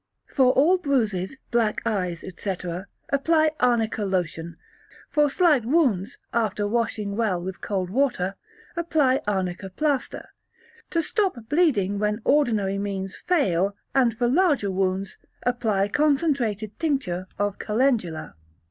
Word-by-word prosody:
For 260 -3 +5
all 345 +7 +4
bruises, 230 - 0
black 230 -3 +1
eyes, 180 -6 -1
etc., 180 -1 -5 0.2
apply 310 +3 +3
Arnica 225 -3 +1
lotion; 170 -3 -2 0.5
for 295 -2 +3
slight 300 - +3
wounds, 240 - +1 0.2
after 210 -3 0
washing 215 -2 -1
well 210 -5 0
with 185 +2 -6
cold 185 -3 -2
water, 240 -7 +1 0.4
apply 310 -6 +2
Arnica 190 -1 -2
plaster; 285 +6 -2 0.6
to 335 -1 0
stop 390 - 0
bleeding 225 - +2
when 210 +1 0
ordinary 215 -9 +2
means 195 -1 -4
fail, 200 - +1 0.2
and 245 -4 +2
for 240 - +1
larger 285 - +2
wounds, 190 0 -1 0.3
apply 220 -5 +1
concentrated 255 - 0
tincture 235 - -1
of 205 0 -1
Calendula. 215 - 0
220 Hz, 120 wpm, -24 LUFS, 195-275 Hz, 0.6 s, For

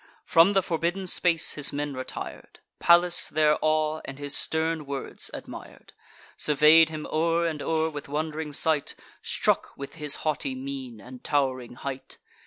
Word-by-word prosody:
From 170 +5 +5
the 195 -1 +2
forbidden 175 +2 -2
space 170 -2 +3
his 145 -2 -1
men 145 0 -3
retir'd. 130 0 -8 0.2
Pallas 175 0 +5
their 150 0 +2
awe, 155 0 +1
and 135 - -8
his 145 0 -3
stern 160 -1 -1
words, 140 -1 -5
admir'd; - - -10 0.4
Survey'd 155 +2 +5
him 155 -1 -6
o'er 165 +2 0
and 155 -3 -3
o'er 160 0 0
with 145 -3 -7
wond'ring 155 +1 -3
sight, 150 0 +2 0.3
Struck - - -1
with 140 0 -8
his 150 -2 +1
haughty 145 -3 -1
mien, 130 -3 -7
and 125 +4 -12
tow'ring 130 -4 -1
height. 135 +1 -7
155 Hz, 150 wpm, -26 LUFS, 140-160 Hz, 0.4 s, From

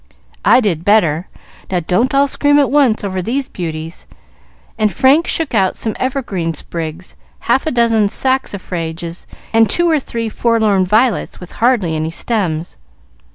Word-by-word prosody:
"I 255 - +5
did 175 -8 -1
better. 180 -5 +2 0.4
Now, 180 -2 0
don't 230 - 0
all 280 +1 +4
scream 290 +1 +2
at 285 -3 +2
once 270 -8 +3
over 190 -2 -2
these 255 +8 -2
beauties;" 160 -2 -6 0.7
and 215 -1 +1
Frank 275 - +3
shook 320 -5 -2
out 195 -4 +1
some 220 - -3
evergreen 205 - -2
sprigs, 165 +3 -6 0.3
half 260 +6 +1
a - - +1
dozen 230 -3 +2
saxifrages, 175 -10 -3 0.3
and 225 -2 +4
two 345 - +2
or 315 -3 +3
three 230 -4 -4
forlorn 220 -4 +1
violets 220 +4 +1
with 180 - -11
hardly 220 -9 +1
any 155 +1 -2
stems. 170 -3 -2
215 Hz, 150 wpm, -16 LUFS, 175-255 Hz, 0.7 s, I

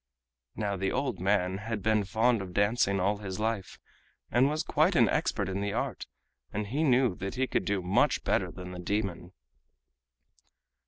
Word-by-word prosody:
Now 100 -2 -2
the 95 +1 -1
old 135 +1 -1
man 95 0 +1
had 110 -2 -4
been 110 -1 +2
fond 110 +3 +2
of 90 -2 -8
dancing 100 -1 +2
all 100 +3 +1
his 95 -1 -6
life, 110 -4 -2 0.5
and 125 +4 +4
was 155 +1 -1
quite 160 +5 +2
an - - +5
expert 150 - 0
in 95 +1 -2
the 100 0 -2
art, - - -3 0.4
and 105 +1 -2
he 135 +10 -1
knew 125 - +3
that 95 +4 -5
he 130 +1 +1
could - - -1
do 100 -2 -1
much 90 +2 +2
better - - +1
than 90 0 -8
the 90 - -7
demon. 95 -2 -2
105 Hz, 175 wpm, -29 LUFS, 95-120 Hz, 0.5 s, an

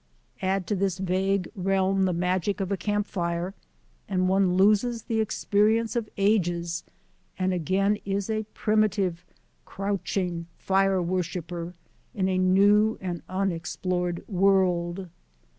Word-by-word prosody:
Add 190 0 0
to 205 - -1
this 195 -1 0
vague 190 0 0
realm 195 0 +1
the 185 - +1
magic 180 +3 0
of 195 0 -2
a - - +2
camp 205 +1 -1
fire, 170 -1 -2 0.6
and 185 -2 +1
one 190 -1 +3
loses 215 +4 +3
the 225 -2 0
experience 220 +2 +1
of 230 -3 -2
ages 175 -4 +1 0.5
and 185 0 0
again 195 +4 +1
is 195 0 -2
a 220 -1 -1
primitive, 205 -5 +1 0.4
crouching 190 -3 -3
fire 195 -1 +2
worshipper 175 -1 -3 0.4
in 190 -2 +1
a 185 -1 +1
new 205 +4 +4
and 175 -3 -4
unexplored 180 -1 -2
world. 185 -2 +2
190 Hz, 125 wpm, -26 LUFS, 180-200 Hz, 0.6 s, new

